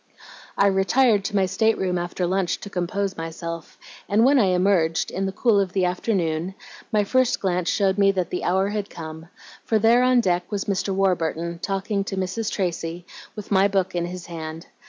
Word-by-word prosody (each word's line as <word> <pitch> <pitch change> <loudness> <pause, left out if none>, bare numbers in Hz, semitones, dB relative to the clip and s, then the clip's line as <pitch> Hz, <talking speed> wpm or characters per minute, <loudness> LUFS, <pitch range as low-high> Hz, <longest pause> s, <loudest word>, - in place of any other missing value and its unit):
"I 200 - +4
retired 200 +3 +3
to 205 - -3
my 195 -1 +3
state 220 +4 +1
room 180 -2 -1
after 175 +1 -2
lunch 185 0 0
to 200 - -8
compose 190 +2 -2
myself, 165 0 -6 0.3
and 215 +3 +4
when 275 +1 +5
I 215 - +4
emerged, 180 -3 +2
in 195 +1 -2
the - - -2
cool 215 +1 +2
of 190 -2 -1
the 190 -2 +2
afternoon, 180 -2 -1 0.4
my 210 -2 +3
first 255 +4 +2
glance 180 -2 0
showed 195 -1 +1
me 200 0 +5
that 185 -2 -2
the 180 - -3
hour 190 +2 +1
had 205 -1 -3
come, 160 0 -8 0.4
for 220 - +1
there 225 +3 +4
on 255 0 +4
deck 180 -5 0
was 205 -1 -2
Mr. 195 0 -1
Warburton, 170 -3 0
talking 195 +1 -2
to 195 - -4
Mrs. 190 +4 -2
Tracy, 175 -2 -3 0.3
with 210 -2 -9
my 195 0 +5
book 195 -2 0
in 175 -1 -1
his 180 0 -7
hand. 160 -1 -7
190 Hz, 195 wpm, -23 LUFS, 175-200 Hz, 0.4 s, when